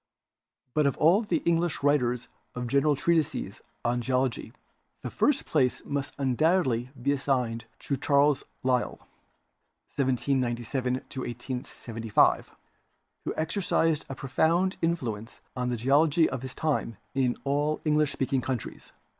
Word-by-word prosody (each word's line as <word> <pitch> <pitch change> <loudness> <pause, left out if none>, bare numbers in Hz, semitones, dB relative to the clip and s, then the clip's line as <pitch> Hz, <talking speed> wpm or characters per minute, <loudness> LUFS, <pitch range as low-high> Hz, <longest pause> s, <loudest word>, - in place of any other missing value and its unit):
But 150 -2 +3
of 140 - 0
all 175 +7 +5
the 215 - -1
English 170 -3 +1
writers 125 -4 +2 0.3
of 125 0 -3
general 140 +4 +3
treatises 165 +2 0 0.2
on 120 +1 +1
geology, 130 -2 -1 0.5
the - - -4
first 285 -2 +2
place 130 -4 +1
must 140 -1 -3
undoubtedly 135 -2 +2
be 140 +4 +1
assigned 125 -5 0 0.2
to 140 - -1
Charles 140 +1 +3 0.2
Lyell 130 -1 +1 1.0
(1797 125 -1 0 0.2
1875), 120 -3 -1 0.8
who - - -1
exercised 160 -2 0
a 135 - -4
profound 165 +8 +1
in 170 +1 +2
fluence 115 -5 -6 0.2
on 125 -1 -1
the 120 - -1
geology 145 +6 +4
of 130 -2 -4
his 130 -1 -7
time 145 -8 -1 0.2
in 130 -3 +1
all 145 +2 0
English 150 -1 +3
speaking 135 -1 0
countries. 125 -3 -5
135 Hz, 125 wpm, -28 LUFS, 125-150 Hz, 1.0 s, all